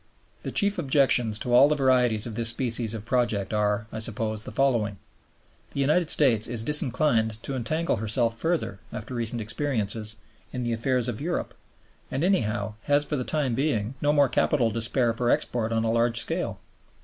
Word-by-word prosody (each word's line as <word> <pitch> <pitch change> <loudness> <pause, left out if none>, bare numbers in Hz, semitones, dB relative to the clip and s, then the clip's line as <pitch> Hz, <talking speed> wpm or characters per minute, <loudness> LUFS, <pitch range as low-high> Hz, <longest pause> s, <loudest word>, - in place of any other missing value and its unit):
The - - -5
chief 205 0 +1
objections 130 -6 +3
to 120 +2 -2
all 135 +4 +7
the 150 - +2
varieties 125 -6 +2
of 115 - -5
this 115 +1 +1
species 115 -2 0
of 110 -1 -8
project 115 -6 0
are, 105 0 0
I 110 - -5
suppose, 110 -1 -2
the - - -7
following. 115 -7 0 0.8
The - - -3
United 155 +4 +2
States 120 -8 +4
is 115 -2 -2
disinclined 125 -5 +1
to 135 - -4
entangle 155 +8 -1
herself 115 +2 +3
further 160 - -2
(after 115 +4 -7
recent 115 -1 -2
experiences) 110 -3 -2 0.4
in 125 - -4
the 120 -1 -1
affairs 125 +1 0
of 120 -1 -4
Europe, 175 +3 -3 0.6
and, 140 - -2
anyhow, 115 - 0
has 145 0 +2
for 150 - -3
the 130 - -2
time 140 -3 -1
being 120 -4 -1
no 145 - +2
more 145 -2 +4
capital 125 -2 +1
to 115 +2 -3
spare 120 +1 +1
for 120 +1 -1
export 115 -2 0
on 115 0 0
a 115 - 0
large 115 0 +1
scale. - - -3
120 Hz, 185 wpm, -25 LUFS, 110-140 Hz, 0.8 s, all